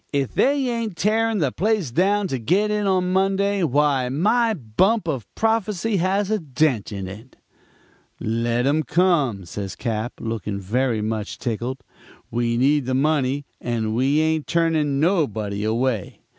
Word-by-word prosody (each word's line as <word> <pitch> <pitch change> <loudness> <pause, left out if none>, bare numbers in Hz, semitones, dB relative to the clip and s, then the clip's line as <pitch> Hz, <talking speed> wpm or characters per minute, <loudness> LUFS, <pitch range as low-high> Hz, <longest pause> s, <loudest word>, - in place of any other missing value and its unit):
'If 140 -3 -1
they 275 -1 +2
ain't 230 -6 -3
tearing 220 +5 +1
the 145 -8 +1
place 205 - 0
down 195 - +2
to 130 - -2
get 190 - +1
in 210 -1 0
on 185 -1 +1
Monday, 195 +1 +1
why 145 -4 +2
my 220 - +2
bump 170 - +1
of 130 -10 -3
prophecy 220 -2 0
has 190 +3 0
a 215 - +1
dent 135 - 0
in 100 -2 -5
it.' 110 +7 -11 0.8
"'Let 115 +2 0
'em 145 +3 +2
come,' 150 - +1
says 95 +3 -6
Cap., 115 -1 -3
looking 110 -3 -4
very 115 +3 0
much 110 -1 -3
tickled. 120 +3 -4 0.5
'We 115 0 0
need 140 +2 +3
the 130 - 0
money 140 -1 +1 0.2
and 115 -2 -2
we 135 +6 +2
ain't 160 -1 0
turning 160 -4 +1
nobody 110 - 0
away. 115 -2 -1
145 Hz, 150 wpm, -22 LUFS, 115-190 Hz, 0.8 s, need